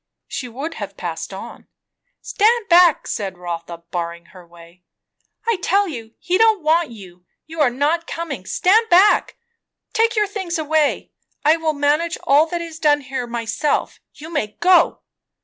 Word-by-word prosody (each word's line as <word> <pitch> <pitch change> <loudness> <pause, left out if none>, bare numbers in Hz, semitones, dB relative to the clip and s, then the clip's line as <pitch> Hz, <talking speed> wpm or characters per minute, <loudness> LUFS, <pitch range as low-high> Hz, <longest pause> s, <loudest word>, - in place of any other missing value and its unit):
She 265 -3 -5
would 275 +8 -6
have - - -7
passed - - -5
on. - - -10 0.5
"Stand 445 +1 +1
back!" 345 -3 +5
said 195 -4 -4
Rotha, 170 -1 -7
barring 170 -1 -4
her 180 -2 -14
way. 170 +1 -17 0.6
"I 460 -3 +1
tell 400 +3 +2
you, 230 -8 -8
he 360 +1 -1
don't 440 -5 +4
want 320 +1 +2
you, 190 -6 -12
and 180 - -38 0.2
you 320 0 -5
are 280 - +5
not 295 +7 -1
coming. 280 - -6
Stand 445 +5 +3
back! 375 +4 +4 0.6
Take 460 +1 +2
your 425 -1 +3
things 380 -4 -4
away. 310 -1 0 0.3
I 310 +2 +6
will 320 -1 -1
manage 300 +4 0
all 295 +3 +4
that 345 +1 -3
is 330 -1 -8
done 295 -2 +3
here 265 -2 -5
myself. 235 +4 -2 0.2
You 315 +3 -10
may 215 -9 -3
go!" 355 -1 +4
305 Hz, 165 wpm, -20 LUFS, 225-345 Hz, 0.6 s, I